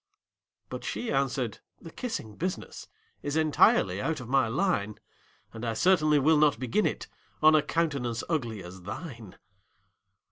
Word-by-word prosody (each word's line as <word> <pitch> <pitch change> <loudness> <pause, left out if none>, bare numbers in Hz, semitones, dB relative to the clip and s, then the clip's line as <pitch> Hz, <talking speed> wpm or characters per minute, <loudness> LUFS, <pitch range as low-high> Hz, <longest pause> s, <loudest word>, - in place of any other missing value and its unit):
But - - -6
she 240 - -3
answered, 135 -4 -1 0.2
"The 165 - -11
kissing 155 - -5
business 180 - -5 0.3
Is 145 +1 -3
entirely 145 -11 +3
out 155 +3 -1
of 120 - -8
my 130 -1 +3
line; 115 - 0 0.6
And 110 - -8
I 115 -2 -1
certainly 155 +1 +4
will 150 +2 +4
not 150 -5 +4
begin 130 - +1
it - - -4 0.4
On 155 0 +8
a 155 - +5
countenance 140 -9 -1
ugly 120 - -2
as 90 +1 -10
thine!" 110 - -8
135 Hz, 145 wpm, -28 LUFS, 115-160 Hz, 0.6 s, On